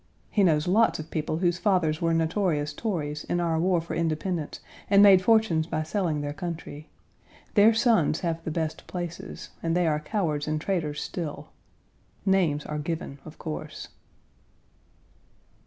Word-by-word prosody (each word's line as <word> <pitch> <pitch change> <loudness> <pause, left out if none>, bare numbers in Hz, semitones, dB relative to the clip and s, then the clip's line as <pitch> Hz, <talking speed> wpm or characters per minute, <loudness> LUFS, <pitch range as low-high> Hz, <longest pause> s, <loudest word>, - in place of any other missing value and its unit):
He 210 - +2
knows 155 -4 +3
lots 220 +5 +3
of 155 0 -8
people 155 0 -2
whose 175 0 +1
fathers 175 -6 +1
were 165 0 +2
notorious 165 -2 0
Tories 150 -8 -3
in 175 - -1
our 165 -2 +1
war 180 +1 +2
for 165 - -6
independence 165 0 -2 0.3
and 200 0 +7
made 195 -2 +8
fortunes 190 -7 +3
by 155 - -1
selling 160 -3 -1
their 145 0 -3
country. 165 -3 -6 0.6
Their 215 +2 +6
sons 220 - +3
have 165 -2 -2
the - - -3
best 160 -1 -3
places, 175 -2 -6
and 165 +1 0
they 180 - +2
are 150 -2 +1
cowards 155 -4 -2
and 155 0 0
traitors 155 -4 -2
still. 165 -5 -5 0.8
Names 175 -7 +2
are 150 0 -4
given, 155 -2 -4
of 155 - -11
course. 155 -1 -6
165 Hz, 155 wpm, -27 LUFS, 155-185 Hz, 0.8 s, made